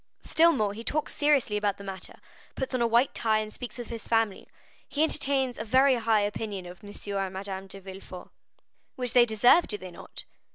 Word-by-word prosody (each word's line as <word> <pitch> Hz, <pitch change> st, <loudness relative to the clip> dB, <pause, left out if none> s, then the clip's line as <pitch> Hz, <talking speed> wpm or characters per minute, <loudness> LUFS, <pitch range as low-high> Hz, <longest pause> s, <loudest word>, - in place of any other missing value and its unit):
"Still 335 Hz, +1 st, +4 dB
more, 215 Hz, -9 st, 0 dB
he 225 Hz, +3 st, -8 dB
talks 305 Hz, +5 st, -2 dB
seriously 285 Hz, -8 st, +2 dB
about 205 Hz, -1 st, 0 dB
the 200 Hz, -, -10 dB
matter, 195 Hz, -1 st, -7 dB, 0.4 s
puts 265 Hz, 0 st, -4 dB
on 255 Hz, -, 0 dB
a 235 Hz, -, +3 dB
white 235 Hz, +3 st, +3 dB
tie, 220 Hz, -1 st, +2 dB
and 215 Hz, 0 st, -3 dB
speaks 245 Hz, -2 st, -8 dB
of 240 Hz, -, -7 dB
his 230 Hz, -2 st, -6 dB
family. 225 Hz, -4 st, +1 dB, 0.4 s
He 295 Hz, -, 0 dB
entertains 270 Hz, -5 st, +1 dB
a -, -, -2 dB
very 260 Hz, +5 st, +4 dB
high 225 Hz, -3 st, +2 dB
opinion 205 Hz, -2 st, -3 dB
of 175 Hz, +1 st, -11 dB
M. 205 Hz, -, -9 dB, 0.3 s
and 195 Hz, -1 st, -2 dB
Madame 195 Hz, 0 st, -5 dB
de 195 Hz, +1 st, -10 dB
Villefort." 190 Hz, -1 st, -10 dB, 0.6 s
"Which 250 Hz, -4 st, -3 dB
they 245 Hz, -2 st, +6 dB
deserve, 240 Hz, +10 st, +5 dB
do 210 Hz, -, -2 dB
they 185 Hz, -2 st, -9 dB
not?" -, -, -10 dB
220 Hz, 205 wpm, -28 LUFS, 200-255 Hz, 0.6 s, they